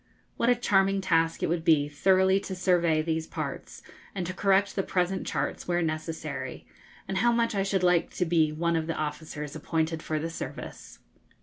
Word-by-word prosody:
What 235 Hz, -, +1 dB
a 245 Hz, -, +5 dB
charming 195 Hz, -4 st, +2 dB
task 165 Hz, -3 st, +1 dB
it -, -, +2 dB
would 165 Hz, 0 st, -1 dB
be 155 Hz, -4 st, +4 dB
thoroughly 190 Hz, +5 st, +3 dB
to 195 Hz, -1 st, -6 dB
survey 170 Hz, -4 st, +2 dB
these 160 Hz, 0 st, -2 dB
parts, -, -, -6 dB, 0.3 s
and 185 Hz, -2 st, -2 dB
to 185 Hz, -, -4 dB
correct 195 Hz, +1 st, +2 dB
the 195 Hz, -, +1 dB
present 185 Hz, 0 st, -1 dB
charts -, -, -3 dB
where 175 Hz, -1 st, +1 dB
necessary, 160 Hz, 0 st, -4 dB, 0.4 s
and 190 Hz, -, -2 dB
how 240 Hz, +3 st, +4 dB
much 235 Hz, -1 st, +1 dB
I 200 Hz, -, 0 dB
should 195 Hz, -1 st, 0 dB
like 180 Hz, -2 st, +3 dB
to 180 Hz, -, +1 dB
be 160 Hz, -2 st, +2 dB
one 170 Hz, +2 st, 0 dB
of 160 Hz, -1 st, -1 dB
the 165 Hz, -, -2 dB
officers 150 Hz, -1 st, -5 dB
appointed 160 Hz, +1 st, -1 dB
for 155 Hz, -, -2 dB
the 165 Hz, +2 st, -3 dB
service! -, -, -8 dB
175 Hz, 190 wpm, -28 LUFS, 160-195 Hz, 0.4 s, a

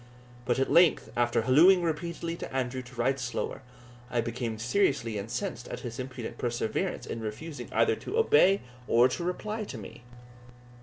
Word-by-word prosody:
But 125 Hz, 0 st, +1 dB
at 135 Hz, -, 0 dB
length, 170 Hz, -2 st, +4 dB
after 120 Hz, -1 st, +2 dB
hallooing 175 Hz, +9 st, +6 dB
repeatedly 170 Hz, +1 st, -2 dB
to -, -, -7 dB
Andrew 130 Hz, -1 st, -2 dB
to 125 Hz, 0 st, -14 dB
ride 130 Hz, +3 st, +1 dB
slower, 125 Hz, +1 st, -3 dB, 0.5 s
I 120 Hz, -, 0 dB
became 115 Hz, -1 st, -3 dB
seriously 120 Hz, -, +1 dB
incensed 120 Hz, +3 st, -4 dB
at -, -, -6 dB
his 120 Hz, -1 st, -6 dB
impudent 130 Hz, -2 st, -6 dB
perseverance 120 Hz, -2 st, -2 dB
in -, -, -5 dB
refusing 115 Hz, +9 st, -6 dB
either -, -, +3 dB
to 445 Hz, -, -4 dB
obey 320 Hz, -, +5 dB, 0.3 s
or 120 Hz, +2 st, +5 dB
to 170 Hz, -, -3 dB
reply 210 Hz, +5 st, -3 dB
to 130 Hz, -, -7 dB
me. 105 Hz, +2 st, -10 dB
125 Hz, 160 wpm, -29 LUFS, 120-170 Hz, 0.5 s, hallooing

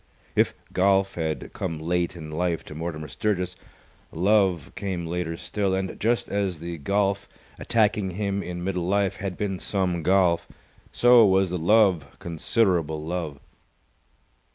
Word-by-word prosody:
If -, -, +3 dB, 0.2 s
golf 95 Hz, +1 st, +3 dB
had 80 Hz, -2 st, -3 dB
come 80 Hz, -, -3 dB
late 85 Hz, +3 st, -1 dB
in 80 Hz, -2 st, -8 dB
life 85 Hz, +1 st, -1 dB
to -, -, -9 dB
Mortimer 80 Hz, -1 st, -5 dB
Sturgis, 90 Hz, +5 st, -1 dB, 0.6 s
love 95 Hz, -3 st, +2 dB
came 95 Hz, -4 st, -3 dB
later 85 Hz, -1 st, -3 dB
still, 100 Hz, 0 st, -1 dB
and 95 Hz, -1 st, -3 dB
just 115 Hz, +2 st, +1 dB
as 100 Hz, -4 st, -1 dB
the 85 Hz, +1 st, -6 dB
golf, 100 Hz, +4 st, 0 dB, 0.3 s
attacking 105 Hz, -3 st, +1 dB
him 100 Hz, +1 st, -2 dB
in 90 Hz, -2 st, -5 dB
middle 90 Hz, -2 st, -2 dB
life, 100 Hz, 0 st, +1 dB
had 95 Hz, -3 st, -4 dB
been 95 Hz, -3 st, -2 dB
some 90 Hz, -4 st, -1 dB
golf, 90 Hz, 0 st, +3 dB, 0.4 s
so 120 Hz, -1 st, +6 dB
was 95 Hz, -2 st, +3 dB
the 90 Hz, -, -2 dB
love 90 Hz, -5 st, +3 dB
considerable 85 Hz, -3 st, 0 dB
love. 80 Hz, -4 st, -4 dB
90 Hz, 140 wpm, -25 LUFS, 85-100 Hz, 0.6 s, so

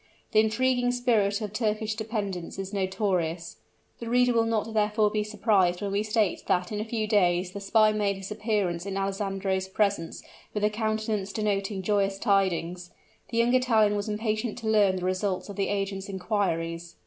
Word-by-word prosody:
The 215 Hz, -, +5 dB
intriguing 245 Hz, +3 st, +2 dB
spirit 225 Hz, -4 st, +1 dB
of 210 Hz, -1 st, -4 dB
Turkish 215 Hz, -1 st, -1 dB
dependents 210 Hz, -6 st, -4 dB
is 195 Hz, +1 st, -5 dB
notorious: 185 Hz, -4 st, -1 dB, 0.4 s
the 235 Hz, -, -5 dB
reader 245 Hz, 0 st, +3 dB
will 230 Hz, -1 st, +2 dB
not 225 Hz, 0 st, -1 dB
therefore 210 Hz, 0 st, +2 dB
be 210 Hz, 0 st, 0 dB
surprised 200 Hz, -4 st, +2 dB
when 200 Hz, -1 st, -3 dB
we 200 Hz, +1 st, +1 dB
state 215 Hz, -2 st, 0 dB
that 180 Hz, +1 st, +1 dB
in 210 Hz, -, -2 dB
a 215 Hz, -, -2 dB
few 220 Hz, -1 st, -2 dB
days 180 Hz, -4 st, +2 dB
the 200 Hz, -, -6 dB
spy 215 Hz, +2 st, +4 dB
made 205 Hz, -2 st, 0 dB
his 195 Hz, +1 st, -8 dB
appearance 205 Hz, -5 st, -1 dB
in 195 Hz, 0 st, -3 dB
Alessandro's 195 Hz, -1 st, -1 dB
presence 195 Hz, -4 st, -1 dB, 0.3 s
with 210 Hz, -, -1 dB
a 210 Hz, -, +3 dB
countenance 215 Hz, -2 st, -1 dB
denoting 200 Hz, -2 st, -1 dB
joyous 200 Hz, -1 st, +1 dB
tidings. 180 Hz, -4 st, 0 dB, 0.4 s
The 230 Hz, -, -3 dB
young 235 Hz, +1 st, +3 dB
Italian 225 Hz, -5 st, +3 dB
was 205 Hz, +1 st, -2 dB
impatient 215 Hz, +2 st, -2 dB
to 230 Hz, -2 st, -5 dB
learn 205 Hz, -3 st, +4 dB
the 180 Hz, -1 st, -3 dB
results 185 Hz, +1 st, -1 dB
of 200 Hz, -, -7 dB
the 200 Hz, 0 st, 0 dB
agent's 195 Hz, -1 st, -2 dB
inquiries. 175 Hz, -4 st, -2 dB
205 Hz, 175 wpm, -27 LUFS, 190-215 Hz, 0.4 s, The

